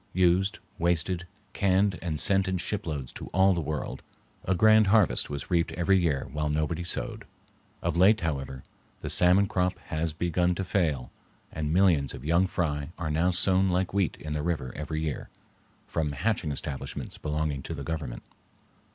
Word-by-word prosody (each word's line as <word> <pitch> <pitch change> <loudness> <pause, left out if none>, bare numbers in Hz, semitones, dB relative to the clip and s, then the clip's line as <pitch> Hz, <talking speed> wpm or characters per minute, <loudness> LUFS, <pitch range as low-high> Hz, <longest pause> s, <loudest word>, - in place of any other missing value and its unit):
Used, 95 +2 +2 0.2
wasted, 85 +1 0 0.3
canned 95 0 +2
and 80 -4 -3
sent 95 +1 +3
in 95 0 0
shiploads 80 -8 -4
to - - -8
all 95 +1 +4
the 85 - -1
world, 75 -2 -4 0.4
a 95 - +1
grand 110 +1 +6
harvest 105 -2 +3
was 70 +5 -6
reaped 85 -1 +2
every 95 +2 +3
year 75 -6 0
while 75 0 -1
nobody 75 +3 -1
sowed. 85 - -3 0.6
Of - - 0
late, 95 +5 +5
however, 70 -5 -3 0.4
the - - -4
salmon 90 +3 +6
crop 90 -1 0 0.2
has 80 +1 0
begun 85 +2 0
to 95 - -2
fail, 80 -9 -1 0.4
and 75 -1 -3
millions 85 -6 +3
of 65 0 -10
young 85 +4 +3
fry 75 -5 -2
are 85 -3 -3
now 85 +4 +2
sown 95 +1 +2
like 90 +1 0
wheat 100 -4 0
in 75 -1 -6
the 75 - -1
river 75 -6 -2
every 80 +1 -3
year, 75 -3 -4 0.6
from 75 -3 -2
hatching 90 +2 -1
establishments 70 -1 -5
belonging 75 -2 -2
to - - -5
the - - -6
Government. 75 -7 -5
85 Hz, 170 wpm, -28 LUFS, 75-95 Hz, 0.6 s, grand